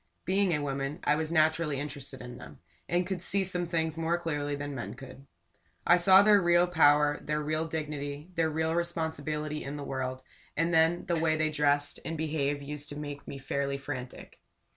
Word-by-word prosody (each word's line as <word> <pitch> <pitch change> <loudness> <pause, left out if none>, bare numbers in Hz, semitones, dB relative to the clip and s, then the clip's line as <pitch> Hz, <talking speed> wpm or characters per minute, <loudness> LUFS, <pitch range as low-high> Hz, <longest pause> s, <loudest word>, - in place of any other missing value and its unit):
Being 195 0 +2
a 150 -3 0
woman, 140 +1 -3
I 150 - +3
was 155 +1 -2
naturally 155 -3 +2
interested 140 -2 -6
in 125 0 -9
them, 70 -1 -11 0.3
and 175 +1 +1
could 185 -1 -3
see 195 +2 +1
some 180 -1 -2
things 160 -1 -1
more 165 +1 +1
clearly 145 -4 -2
than 145 0 -5
men 125 -3 -5
could. 135 +1 -12 0.6
I 175 - +6
saw 190 +2 +7
their 205 -1 +6
real 175 0 +4
power, 150 -4 +4
their 150 0 -1
real 155 +2 -1
dignity, 150 0 -5
their 165 -2 +1
real 160 +1 0
responsibility 155 -3 -2
in 140 +1 -5
the 145 - -5
world; 130 -1 -4 0.3
and 165 +2 +1
then 165 +2 +3
the 170 -2 0
way 160 -1 +2
they 155 0 +1
dress 145 -1 +1
and 165 0 -4
behave 145 -2 -1
used 145 +1 -5
to 145 - -7
make 145 -1 -7
me 140 - -6
fairly 140 +1 -2
frantic. 135 -2 -7
150 Hz, 190 wpm, -29 LUFS, 145-165 Hz, 0.6 s, saw